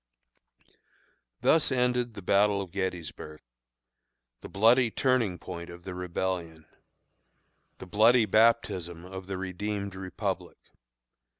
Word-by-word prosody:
Thus 160 -3 +3
ended 125 -2 0
the 100 - -8
battle 100 +2 +3
of 95 -3 -6
Gettysburg 85 -5 -5 1.0
the - - -9
bloody 115 +4 +4
turning 115 -6 +1
point 85 -2 -8
of 85 0 -11
the 95 - -6
Rebellion 90 -3 -4 1.1
the - - -9
bloody 110 +5 +4
baptism 95 -7 +2
of 95 0 -8
the 95 -1 -4
redeemed 100 +2 -4
Republic. 95 -1 -4
95 Hz, 105 wpm, -28 LUFS, 90-110 Hz, 1.1 s, bloody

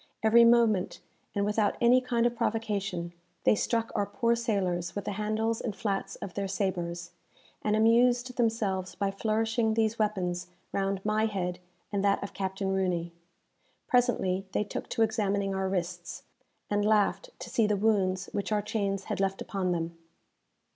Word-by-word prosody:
Every 235 +2 +7
moment, 230 -5 +3 0.4
and 200 0 +1
without 210 0 +1
any 245 +2 +5
kind 240 -2 +1
of 240 0 +1
provocation, 200 -7 -2 0.3
they - - +5
struck 230 +2 0
our 200 - 0
poor 235 -2 +1
sailors 185 -7 -1
with 205 - -4
the - - -2
handles 215 +2 -1
and 215 -4 -3
flats 200 -4 -2
of 185 - -7
their 200 -1 -2
sabres, 175 -3 -2 0.5
and 210 0 +1
amused 240 +3 +3
themselves 210 -6 0
by 200 -1 0
flourishing 220 +2 0
these 225 0 +1
weapons 185 -4 -1 0.2
round 195 0 -1
my 215 +1 +2
head 180 -4 -3 0.3
and 200 -1 0
that 200 0 +2
of 200 - -6
Captain 190 0 -2
Rooney. 175 -3 -1 0.7
Presently 215 -7 +2
they - - +1
took 205 - -6
to 225 - +2
examining 205 -3 0
our 190 0 -1
wrists, 175 -2 -4 0.4
and 205 0 +1
laughed 215 - +2
to - - -8
see 225 -2 +3
the 210 -1 +1
wounds 195 -3 +1
which 205 +1 -2
our 210 -1 +1
chains 200 -2 -1
had - - -4
left 195 0 0
upon 190 -3 -2
them. 170 -1 -2
205 Hz, 160 wpm, -29 LUFS, 190-225 Hz, 0.7 s, Every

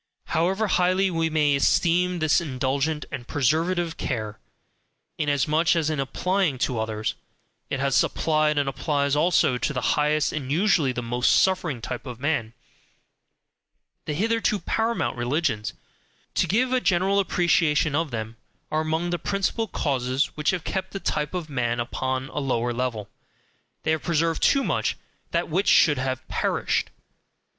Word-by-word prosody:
However 190 +7 +1
highly 185 0 +2
we 165 -1 0
may 150 -2 +2
esteem 175 +5 +2
this 155 +1 +2
indulgent 140 +1 -1
and 125 -3 -6
preservative 165 +5 0
care 110 -1 -4 0.8
(inasmuch 150 +3 +2
as 160 -2 +1
in 155 - -2
applying 180 +3 0
to 120 -3 -3
others, 110 -1 -2 0.6
it 140 - -2
has 135 -1 +3
applied, 155 -1 +1
and 145 -1 +1
applies 140 0 0
also 150 -5 +3
to 150 - -1
the 130 - +1
highest 150 0 +1
and 140 -4 -4
usually 165 -4 +3
the 125 -1 -4
most 120 +1 +1
suffering 175 -9 +2
type 120 +3 -6
of 125 -2 -7
man), 125 -6 -1 1.5
the 150 - -3
hitherto 225 +3 +1
PARAMOUNT 225 -1 -1
religions 120 -3 -1 0.6
to - - +1
give 250 +5 +1
a 255 - +2
general 190 +1 +2
appreciation 165 -5 +2
of 160 +1 0
them 110 -1 -5 0.3
are 155 - +1
among 160 +2 -1
the 175 - -1
principal 200 +3 -1
causes 130 -5 -1
which 150 +1 0
have 180 -3 -1
kept 190 - -4
the 195 - -3
type 150 -2 -2
of 175 -3 -3
"man" 120 -4 -1
upon 130 +2 -2
a - - -4
lower 120 -3 -1
level 120 -4 -3 0.8
they - - +1
have 160 -1 0
preserved 165 -1 0
too 275 -1 +4
much - - -1 0.3
THAT 170 +1 -1
WHICH 185 +6 0
SHOULD 150 -3 +5
HAVE 130 0 -3
PERISHED. - - 0
150 Hz, 150 wpm, -25 LUFS, 130-175 Hz, 1.5 s, SHOULD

